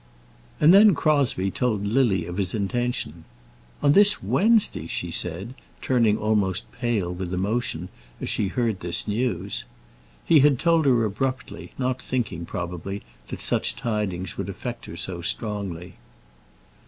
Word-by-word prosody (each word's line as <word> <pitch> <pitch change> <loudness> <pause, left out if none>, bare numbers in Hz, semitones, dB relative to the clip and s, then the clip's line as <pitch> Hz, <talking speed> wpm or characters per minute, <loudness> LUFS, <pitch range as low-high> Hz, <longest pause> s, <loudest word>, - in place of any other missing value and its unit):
And 155 +4 +7
then 200 -1 +7
Crosbie 140 -11 +2
told 110 -4 -1
Lily 110 -3 +2
of 90 +1 -6
his 95 -1 -1
intention. 110 - -2 0.6
"On 145 0 +5 0.3
Wednesday!" 215 - +3
she 85 0 -4
said, 90 +8 -2 0.3
turning 115 -5 +2
almost 105 -4 0
pale 105 -8 -1
with 90 0 -5
emotion 95 -2 -1 0.3
as - - -4
she 100 - 0
heard 115 -1 -1
this 85 +4 -2
news. 120 +4 -2 0.6
He 160 - +6
had 140 -1 +5
told 165 +1 +3
her 120 -4 +4
abruptly, 130 +4 -4
not 130 -1 -1
thinking, 100 -10 -3
probably, 90 +3 -5 0.2
that - - -6
such - - 0
tidings 95 -6 -3
would 100 0 -3
affect 120 +5 -6
her 85 - -8
so 85 -1 -3
strongly. 95 -3 -4
105 Hz, 135 wpm, -24 LUFS, 95-125 Hz, 0.6 s, And